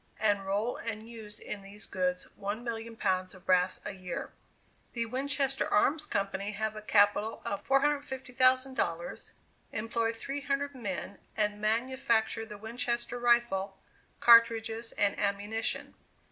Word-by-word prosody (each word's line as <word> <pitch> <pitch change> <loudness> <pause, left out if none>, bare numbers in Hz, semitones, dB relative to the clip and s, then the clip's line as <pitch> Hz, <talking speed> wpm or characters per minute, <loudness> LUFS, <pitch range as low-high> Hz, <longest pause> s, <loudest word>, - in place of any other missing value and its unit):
and 205 -3 +2
roll 205 +5 0
and 220 -1 -4
use 220 -3 -9
in 205 - -5
these 200 +2 -6
goods 180 -1 -1
1,000,000 225 +2 -4
pounds 185 -1 0
of 185 0 -16
brass 185 0 +3
a 210 - -3
year. 185 -2 -5 0.6
The 235 -1 -1
Winchester 270 +2 0
Arms 300 +8 +3
Company 200 +1 -1
have 215 +1 -2
a 215 - -6
capital 210 +1 +3
of 200 0 -3
$450,000, 260 - +1 0.4
employ 225 +1 0
three 275 +5 -5
hundred 280 +1 -1
men, 200 -5 -5 0.2
and 210 -1 0
manufacture 225 0 +1
the 210 -2 -8
Winchester 235 +2 -3
rifle, 235 -5 +2 0.4
cartridges 230 -1 +5
and 205 -1 +1
ammunition. 205 +3 -1
225 Hz, 125 wpm, -31 LUFS, 200-240 Hz, 0.6 s, cartridges